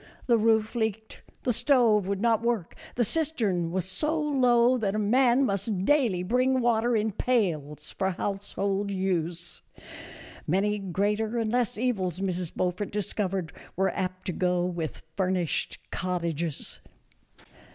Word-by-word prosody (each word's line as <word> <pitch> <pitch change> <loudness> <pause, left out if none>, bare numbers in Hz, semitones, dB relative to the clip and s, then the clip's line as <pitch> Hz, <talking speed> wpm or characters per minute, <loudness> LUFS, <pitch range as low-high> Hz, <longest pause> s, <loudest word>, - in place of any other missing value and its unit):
The 235 -2 +4
roof 220 0 +2
leaked, 220 -2 -3 0.2
the 245 - +1
stove 230 -5 +3
would 200 0 -2
not 230 -2 +3
work, 230 -7 -1 0.2
the 240 - +2
cistern 225 - 0
was 185 0 -1
so 300 - 0
low 255 -4 +3
that 205 -2 -1
a - - 0
man 245 +5 +3
must 200 -2 -1
daily 235 -11 +2
bring 255 +6 +2
water 235 0 +2
in 220 0 +1
pails 155 - -1
for 190 - -1
household 200 +1 -2
use. 175 -3 -2 0.9
Many 205 +5 +1
greater 205 +4 -1
and 225 -2 0
less 245 -3 0
evils 195 -8 -1
Mrs. 180 -3 -2
Beaufort 180 +3 -1
discovered 195 -3 -2 0.2
were 190 +1 +1
apt 185 -1 -4
to 190 - -1
go 180 0 +1
with 170 -7 -4
furnished 185 -5 0
cottages. 170 -4 -3
200 Hz, 135 wpm, -27 LUFS, 185-235 Hz, 0.9 s, The